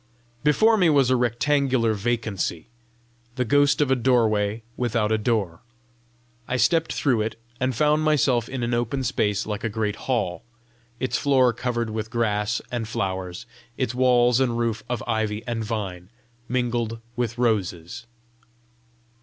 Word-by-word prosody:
Before 220 +10 +4
me 180 -4 +4
was 140 -4 +4
a - - +5
rectangular 125 0 +1
vacancy 105 -6 -2 0.7
the 125 - 0
ghost 145 +5 +3
of 140 -3 +2
a - - +5
doorway 115 -4 +1
without 115 -3 0
a 110 - +3
door: 105 -7 -1 0.9
I 130 - -1
stepped 165 +5 +2
through 125 -6 +1
it, 110 +1 -3 0.2
and 130 -1 0
found 150 +5 +3
myself 135 -6 +2
in 130 -2 -4
an 120 0 -1
open 120 +3 -1
space 105 -4 0
like 105 -1 -4
a 115 - 0
great 105 -1 -2
hall, 95 -10 -1 0.6
its 130 - -1
floor 130 -4 +3
covered 120 -1 -2
with 110 0 -4
grass 110 -1 0
and 120 -3 -3
flowers, 95 -1 -3 0.3
its 125 -3 -1
walls 125 -1 +4
and 120 -3 +1
roof 115 -2 -1
of 120 -2 -2
ivy 110 -2 -1
and 120 -2 -2
vine, 100 -5 -4 0.4
mingled 120 -2 -1 0.2
with 120 -1 -2
roses. 110 -2 -1
120 Hz, 145 wpm, -24 LUFS, 110-130 Hz, 0.9 s, a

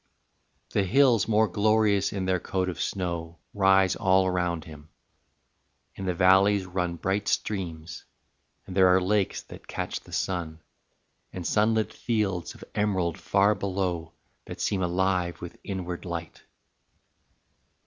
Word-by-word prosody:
IX. - - -21
The 100 - +2
hills 120 -1 +4
more 110 0 +3
glorious 105 0 +2
in 95 -2 -3
their 95 -1 +1
coat 95 +1 -2
of 90 - -5
snow 85 -3 -3 0.2
Rise 95 -2 +4
all 95 0 +3
around 90 -3 -1
him, 75 -1 -12 1.0
in 95 - -7
the 90 - 0
valleys 95 +2 +4
run 90 -1 -2
Bright 95 +4 -2
streams, 85 -5 -3 0.6
and 90 - -8
there 95 -1 +6
are 90 +1 +5
lakes 95 +1 0
that - - -13
catch - - -4
the - - -17
sun, 85 -4 -3 0.7
And 90 -2 -6
sunlit 110 +2 +1
fields 105 -7 -2
of - - -12
emerald 95 -5 0
far 100 +1 +3
below 90 -5 -3 0.3
That - - -8
seem 100 -2 0
alive 90 0 0
with 85 - -9
inward 90 -3 -5
light. 85 -2 -6
95 Hz, 140 wpm, -27 LUFS, 85-100 Hz, 1.0 s, there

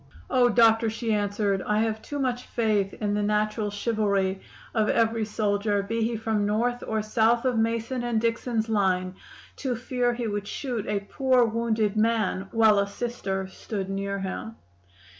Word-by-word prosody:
"'Oh, 245 -1 +4
doctor!' 225 -1 +4
she 225 0 -2
answered, 205 -1 0
'I 210 0 0
have 220 -1 -1
too 290 - -6
much 255 -3 -1
faith 210 -4 +1
in 205 -1 -2
the 210 - 0
natural 210 +1 0
chivalry 200 -3 0 0.3
of 215 -2 +2
every 225 -1 +2
soldier 205 -1 0
be 225 +3 -2
he 230 +1 0
from 220 -1 0
North 235 +4 0
or 220 -1 -1
South 225 +3 +2
of 255 -2 +2
Mason 230 +3 -1
and 240 -2 0
Dixon's 230 0 -1
line 185 -4 +1 0.4
to 260 -3 -2
fear 245 +1 0
he 240 -1 -3
would 205 -2 -3
shoot 245 -5 -4
a 205 -1 0
poor, 255 +3 +2
wounded 220 -2 0
man 215 -3 +1
while 220 -3 +5
a 200 - +1
Sister 200 -3 -3
stood 195 0 -5
near 200 0 -2
him! 195 +3 -5
220 Hz, 165 wpm, -26 LUFS, 205-230 Hz, 0.4 s, while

